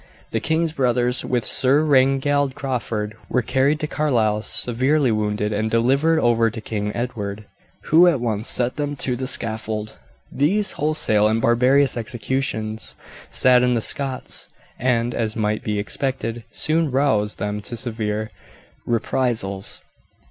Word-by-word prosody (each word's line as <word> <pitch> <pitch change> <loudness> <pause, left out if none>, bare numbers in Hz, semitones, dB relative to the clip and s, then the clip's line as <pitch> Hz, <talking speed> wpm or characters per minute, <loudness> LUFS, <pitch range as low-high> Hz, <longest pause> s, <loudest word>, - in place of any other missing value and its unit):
The - - 0
king's 160 0 0
brothers, 125 -3 +1
with 120 -3 -1
Sir 135 +4 +2
Reginald 135 0 +2
Crawford, 115 -6 -3
were 125 - +1
carried 135 +5 +1
to - - 0
Carlisle 115 -9 +1
severely 130 +4 +1
wounded, 105 0 -1
and 110 +2 -1
delivered 135 +8 +2
over 115 -5 +3
to 115 +1 -7
King 105 -1 -3
Edward, 110 -4 -4 0.5
who 170 +3 +7
at 165 -7 +3
once 110 -2 -2
sent 125 0 +1
them 145 -1 -2
to 130 -2 -1
the 130 +1 -4
scaffold. 110 -3 -2 0.3
These 190 +9 +1
wholesale 145 -9 +2
and 110 +1 +1
barbarous 125 +4 +3
executions 110 -1 -3 0.3
saddened 125 -1 +4
the - - 0
Scots, 135 +2 0 0.3
and, 120 -1 +1
as 110 -2 -2
might 105 +1 -1
be 105 -4 -2
expected, 115 +1 -3
soon 160 0 +1
roused 125 -6 +1
them 105 0 -3
to 120 +3 -4
severe 110 -3 -3 0.6
reprisals. 115 -4 -1
120 Hz, 135 wpm, -21 LUFS, 110-135 Hz, 0.6 s, who